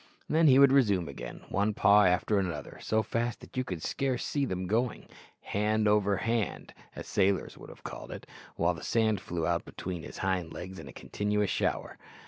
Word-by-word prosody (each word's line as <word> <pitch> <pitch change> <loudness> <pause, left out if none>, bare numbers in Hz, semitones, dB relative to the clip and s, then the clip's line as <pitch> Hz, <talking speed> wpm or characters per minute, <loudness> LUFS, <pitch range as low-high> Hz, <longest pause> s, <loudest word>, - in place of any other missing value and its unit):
Then 160 +1 +4
he 130 -2 +7
would 140 -1 +7
resume 100 -11 +3
again, 70 - -8
one 100 +2 0
paw 105 0 +6
after 90 +3 +2
another 85 -7 -4
so 110 0 +1
fast 115 +2 -2
that - - -14
you 130 - 0
could 90 -10 -6
scarce 130 -3 -1
see 145 -2 0
them 95 -5 -3
going 115 +5 -1 0.3
"hand 105 +1 0
over 105 -1 +3
hand," 115 -4 -2 0.2
as - - -7
sailors 100 -1 +1
would - - -12
have - - -14
called - - -7
it - - -8 0.3
while 85 +2 +2
the 80 - -9
sand 110 -4 +1
flew 85 -2 -3
out 85 0 0
between 90 -2 -6
his - - -9
hind 95 -3 -1
legs 95 +1 -7
in - - -9
a - - -9
continuous 105 -1 -1
shower. - - -2
105 Hz, 195 wpm, -30 LUFS, 90-115 Hz, 0.3 s, he